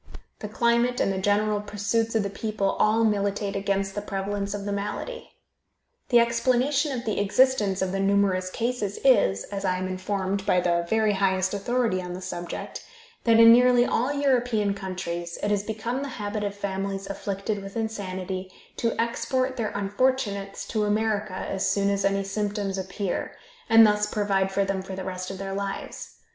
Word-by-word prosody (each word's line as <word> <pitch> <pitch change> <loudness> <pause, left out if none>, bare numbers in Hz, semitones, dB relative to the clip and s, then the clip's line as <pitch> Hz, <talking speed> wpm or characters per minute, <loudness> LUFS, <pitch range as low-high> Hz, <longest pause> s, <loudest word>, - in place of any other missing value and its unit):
The 210 - -5
climate 235 +2 +2
and 195 - +1
the 190 - -2
general 205 +1 +1
pursuits 210 +2 -1
of 220 - +3
the 200 - -2
people 205 -1 -1
all 220 +2 +3
militate 205 -1 0
against 195 0 -1
the 205 - -3
prevalence 200 0 -3
of 200 -1 -6
the 205 - -2
malady. 205 - -4 0.8
The 240 - +5
explanation 255 +5 +2
of 250 -2 -4
the 215 - -1
existence 205 -2 +2
of 185 - -1
the 195 - -2
numerous 195 -2 +2
cases 225 -2 -2
is, 200 - +4
as 200 -1 -4
I 185 -1 +1
am 185 0 -3
informed 190 +1 -2
by 180 - +3
the 170 -1 +1
very 220 -1 +2
highest 190 -1 +1
authority 220 -1 0
on 180 -1 -6
the 185 - -6
subject, 175 -1 -6 0.4
that 230 -1 +5
in 230 0 +10
nearly 245 0 +5
all 250 +4 0
European 245 -7 +1
countries 175 -3 -5
it 205 - +1
has 205 -1 +2
become 225 +5 -3
the 280 - -4
habit 210 0 -3
of 200 -1 -3
families 195 0 -3
afflicted 200 +1 -3
with 195 +2 -8
insanity 190 -4 -4 0.3
to 230 -1 -1
export 245 +3 0
their 225 -4 -1
unfortunates 200 -1 -1
to 215 -2 0
America 210 -2 0
as 195 0 -1
soon 200 0 +1
as 200 0 0
any 195 0 +1
symptoms 200 -1 -2
appear, 190 0 -3 0.4
and 225 0 +8
thus 210 0 +2
provide 200 -2 0
for 200 0 +1
them 195 -1 -1
for 190 0 -7
the 190 - -5
rest 185 -1 -5
of 195 - -6
their 195 0 -5
lives. 200 0 -5
200 Hz, 180 wpm, -26 LUFS, 195-225 Hz, 0.8 s, in